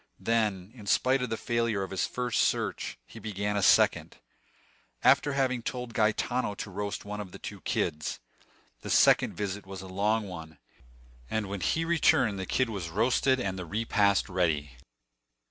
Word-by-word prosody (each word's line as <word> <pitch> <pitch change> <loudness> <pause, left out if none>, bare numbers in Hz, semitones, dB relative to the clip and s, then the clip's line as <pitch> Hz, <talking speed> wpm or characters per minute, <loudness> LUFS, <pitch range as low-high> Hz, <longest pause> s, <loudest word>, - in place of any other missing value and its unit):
Then, 105 -4 0
in 110 -5 -12
spite 130 +5 +3
of 125 - -2
the 115 - -2
failure 115 -5 0
of 95 - -6
his 95 - 0
first 125 -2 -1
search, - - -1
he 115 - -12
began 105 -1 -3
a 100 - +1
second, - - +3 0.9
after 145 - +4
having 130 -3 +1
told 125 0 -5
Gaetano 110 +1 0
to 100 - -6
roast 100 +1 -4
one 105 +1 -5
of 95 -3 -9
the - - -9
two - - -8
kids. 75 -3 -2 0.6
The - - -7
second - - +4
visit 100 -1 -4
was 95 -1 -7
a - - -9
long 105 +3 0
one, 80 -3 -9 0.7
and 110 -2 -1
when 100 -1 -5
he 165 - +1
returned 130 - +3
the 95 - -4
kid 130 -3 +1
was 95 -6 -4
roasted 125 +7 +2
and 95 -5 -2
the 90 - -5
repast 100 0 +2
ready. 80 -6 0
105 Hz, 170 wpm, -29 LUFS, 95-115 Hz, 0.9 s, after